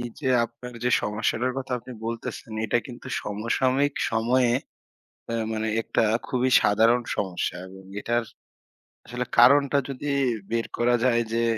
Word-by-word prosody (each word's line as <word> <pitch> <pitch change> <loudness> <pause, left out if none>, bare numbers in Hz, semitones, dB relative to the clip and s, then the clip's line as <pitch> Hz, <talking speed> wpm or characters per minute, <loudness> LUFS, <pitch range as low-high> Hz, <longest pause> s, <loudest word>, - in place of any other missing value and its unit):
এই 120 - -4
যে 135 - -4 0.2
আপনার 115 +2 -10
যে 125 - +2
সমস্যাটার 110 +4 -1
কথা 130 -1 -5
আপনি 125 - -11
বলতেছেন, 115 -1 -5
এটা 115 +2 +2
কিন্তু 125 0 -10 0.2
সমসাময়িক 130 +7 0 0.2
সময়ে, 120 +2 +2 0.8
আ - - -2 0.2
মানে 110 0 -2
একটা - - 0 0.3
খুবই 130 0 +1
সাধারণ 115 +4 +4
সমস্যা 95 -3 -2
এবং 95 0 -12 0.2
এটার 120 +1 0 0.8
আসলে 125 +3 -4
কারণটা 140 +3 +6
যদি 140 +2 -4 0.4
বের 115 0 0
করা 120 +1 +3
যায় 120 -2 +3
যে, 115 0 +1
120 Hz, 140 wpm, -25 LUFS, 115-130 Hz, 0.8 s, কারণটা